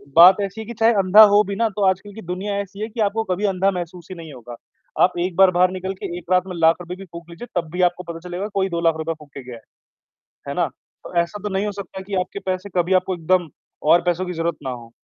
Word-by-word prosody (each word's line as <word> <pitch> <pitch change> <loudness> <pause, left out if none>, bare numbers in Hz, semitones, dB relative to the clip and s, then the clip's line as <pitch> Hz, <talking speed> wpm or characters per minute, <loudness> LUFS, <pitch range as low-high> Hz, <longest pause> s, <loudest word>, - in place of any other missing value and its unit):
बात 180 +3 +9
ऐसी 200 +2 -4
है 220 - -7
कि 235 - -6
चाहे 225 +1 +5
अंधा 195 +3 +7
हो 210 +1 +6
भी 200 - -3
ना, 230 +2 +2
तो 205 -1 -1
आजकल 190 +2 -1
की 220 - -9
दुनिया 190 +3 -3
ऐसी 200 +1 -10
है 220 - -2
कि 225 - -10
आपको 215 +2 +1
कभी 200 +3 0
अंधा 195 0 +2
महसूस 175 -1 -6
ही 185 - -6
नहीं 160 -3 -9
होगा। 120 -1 -10 0.5
आप 180 -1 +2
एक 180 -2 -4
बार 190 0 +6
बाहर 180 0 +4
निकल 190 +1 -4
के 175 - -4
एक 180 +1 -10
रात 180 0 +4
में 185 - -6
लाख 165 0 +4
रुपए 180 +1 -6
भी 195 - -10
फूँक 170 0 -10
लीजिए 170 +8 -9
तब 165 - -15
भी 180 +1 -2
आपको 180 +1 -11
पता 165 - -8
चलेगा 185 +4 -3
कोई 195 -1 +1
2 170 -1 -2
लाख 165 -1 +3
रुपए 160 +1 -2
फूँक 145 -2 -16
के 135 - -8
गया 125 -1 -9
है। - - -16 0.9
है - - -2
ना? - - +1
तो, - - -16
ऐसा 200 +5 -6
तो 210 - -2
नहीं 195 +2 0
हो 210 - -2
सकता 190 0 -7
कि 195 0 -5
आपके 180 +2 -6
पैसे 185 +1 -2
कभी 175 +2 +2
आपको 185 0 -3
एकदम 175 0 +1 0.4
और 175 - +6
पैसों 175 +1 0
की 180 - -4
ज़रूरत 165 0 -2
ना 135 - -3
हो। 120 -2 -9
185 Hz, 280 wpm, -21 LUFS, 170-195 Hz, 0.9 s, बात